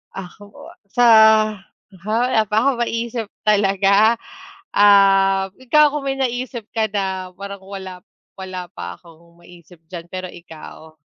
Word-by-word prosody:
Ako 200 +2 -11 0.2
sa, 245 +5 0 1.0
ha, 215 +1 -1 0.2
wala 220 - +3
pa 210 - -3
akong 270 -3 0
ma-isip 230 -1 -4 0.2
talaga. 200 +1 +3 0.6
Ah, 195 -1 +4
ikaw 295 +4 +4
kung 295 -1 -5
may 270 0 -2
na-isip 245 -3 -4
ka 225 -1 0
na, 190 -2 -4
parang 200 0 -9
wala, 190 -2 -9 0.4
wala 185 -2 -7
pa 90 0 -8
akong 170 - -21
ma-isip 170 -1 -18
diyan, 170 -2 -8
pero 185 0 -5
ikaw? 160 -1 -13
195 Hz, 130 wpm, -19 LUFS, 180-220 Hz, 1.0 s, Ah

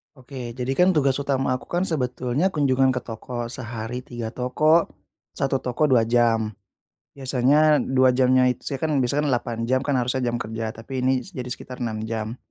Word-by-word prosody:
Oke, 125 -2 -8
jadi 125 +1 -4
kan 180 +1 +5
tugas 140 -3 +2
utama 135 -2 0
aku - - -15
kan 175 +1 -1
sebetulnya 130 +4 -1
kunjungan 135 -3 +3
ke 125 - -2
toko. 120 +1 -6
Sehari 120 -1 -6
3 120 -2 -5
toko, 155 +7 +2 0.5
1 135 -1 0
toko, 130 +4 0
2 115 -3 +4
jam. 115 -2 +2 0.6
Biasanya 140 +4 +3
2 130 -1 +3
jamnya 130 0 +4
it 125 0 +1
saya 135 - -4
kan 155 - 0
biasa 140 +4 +1
kan - - 0
8 120 -1 -2
jam 130 +2 +1
kan 140 -1 0
harusnya 125 +1 0
jam 120 - -1
kerja, 110 -1 -4
tapi 130 +3 -5
ini 130 -1 +1
s - - -13
jadi 125 -1 -6
sekitar 125 +1 -7
6 110 -2 -3
jam. 110 +1 -4
125 Hz, 185 wpm, -24 LUFS, 120-135 Hz, 0.6 s, kan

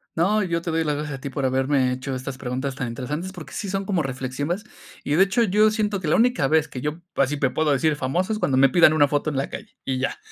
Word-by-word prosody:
No, 200 +6 +2
yo 170 -3 -1
te 170 - -2
doy 165 0 +1
las 150 -2 0
gracias 150 -1 -4
a - - -20
ti 140 - -4
por 135 0 -2
haberme 130 0 +2
hecho 130 +1 -4
estas 130 +1 -6
preguntas 130 +2 -3
tan 135 -3 -3
interesantes, 145 +10 -4
porque 175 -4 -10
sí 200 - -4
son 195 +1 -2
como 190 -4 0
reflexiones, 135 +7 -3 0.4
y 145 - -1
de 175 +5 +6
hecho, 205 +5 +2
yo 215 +1 +4
siento 210 -2 -1
que 165 - -3
la 150 - +3
única 230 - +3
vez 160 +1 +2
que 125 - -7
yo 150 +4 -3
así 140 +2 +1
te 135 -2 +1
puedo 155 -1 +1
decir 150 +2 +2
famoso 160 +10 -1
es 215 - -3
cuando 135 -10 +1
me 135 +1 +6
pidan 155 +2 +6
una 145 -2 +4
foto 145 +2 0
en 145 - -3
la 135 - -1
calle, - - -9
y 130 -1 -1
ya. 130 - -1
150 Hz, 275 wpm, -23 LUFS, 135-180 Hz, 0.4 s, de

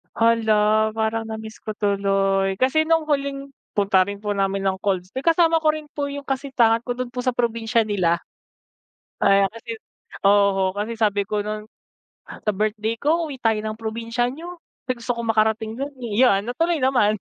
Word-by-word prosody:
Hala, 220 -1 +3
parang 220 +1 -1
na-miss 220 0 -7
ko 215 - -4
tuloy 195 -2 +1
kasi 270 +5 +3
nung 325 -1 +1
huling 275 -1 -1 0.2
punta 195 -3 +3
rin 200 +1 -6
po 205 0 -2
namin 195 0 0
ng 195 -1 0
colds 185 -3 0
may 260 - -3
kasama 330 0 +4
ko 310 - +5
rin 305 -1 -7
po 285 -1 -4
yung 280 0 -7
kasitahan 245 -4 +1
ko 245 - -4
dun 250 +1 -3
po 250 +1 -5
sa 255 - +2
probinsya 230 -1 0
nila. 175 -5 +1 1.0
Ayan 195 0 +5
kasi 230 0 -7 0.5
oho 195 -2 +4
kasi 210 +3 -4
sabi 205 -2 +2
ko 205 -1 -1
nun, 215 0 -5 0.8
"Sa - - +4
birthday 215 +2 -1
ko, 320 +7 0
uwi 285 - -6
tayo 220 -2 +2
ng 215 0 -4
probinsya 230 +2 -2
niyo 340 +6 -8 0.3
kasi 255 -2 -2
gusto 240 0 -2
ko - - -1
makarating 220 0 +1
dun, 275 +3 -4
eh", 235 -4 -4
yan 200 -4 +3
natuloy 330 +6 0
naman. 245 -6 +2
225 Hz, 180 wpm, -22 LUFS, 205-255 Hz, 1.0 s, ko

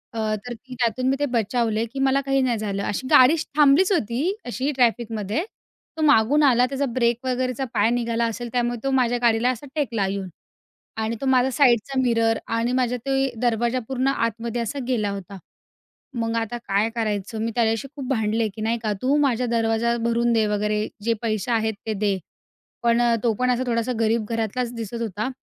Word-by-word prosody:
अ, - - -2 0.3
तर 245 - -5
ती 255 +2 -11
त्यातून 245 +2 0
मी 270 - +2
ते 290 - +2
बचावले 230 0 0
की 275 - -4
मला 270 +1 +2
काही 270 0 +1
नाही 245 -3 +1
झालं. 200 -2 -3
अशी 255 +7 -3
गाडीश 300 +5 +6
थांबलीच 300 +7 +5
होती 235 - 0 0.3
अशी 260 +4 -2
ट्रॅफिकमध्ये, 230 - 0 0.5
तो 315 - -3
मागून 290 +2 +4
आला, 250 -2 +5
त्याचा 275 +2 -2
ब्रेक 240 0 0
वगैरेचा 255 +1 -1
पाय 205 +2 +3
निघाला 235 -1 0
असेल 235 +1 -4
त्यामुळे 240 -1 0
तो 270 - 0
माझ्या 245 -2 +2
गाडीला 235 +1 +3
असा 255 +2 -3
टेकला 235 -9 0
येऊन 195 -1 -3 0.8
आणि 225 +1 -2
तो - - -2
माझा 260 -1 +3
साईडचा 260 -1 +2
मिरर 230 -2 +2 0.2
आणि 235 +2 0
माझा 250 -1 +1
ते 270 -1 +1
दरवाजा 240 +1 +1
पूर्ण 265 0 -1
आतमध्ये 230 -2 -1
असा 235 +5 -3
गेला 215 -5 0
होता. 195 0 -7 0.8
मग 230 0 -1
आता 230 +1 -2
काय 200 +3 +2
करायचं? 215 -1 -2
मी 230 +1 -1
त्याच्याशी 225 +1 +1
खूप 270 -3 -6
भांडले 220 -2 +1
की 215 - -7
नाही 225 +2 0
का, 215 -1 0
"तू 270 +3 +2
माझा 250 -3 +1
दरवाजा 230 +1 +1
भरून 235 0 +2
दे 220 -2 +3
वगैरे. 210 +1 0 0.2
जे 230 +1 +2
पैसे 215 0 -1
आहेत 220 -1 +1
ते 220 - 0
दे." 200 -1 0 0.7
पण, 235 0 +3 0.2
तो 230 - +3
पण 250 +3 0
असा 250 +1 +1
थोडासा 235 +1 0
गरीब 225 0 +1
घरातलाच 230 +2 -2
दिसत 230 0 -5
होता. 215 +1 -3
235 Hz, 185 wpm, -23 LUFS, 220-255 Hz, 0.8 s, गाडीश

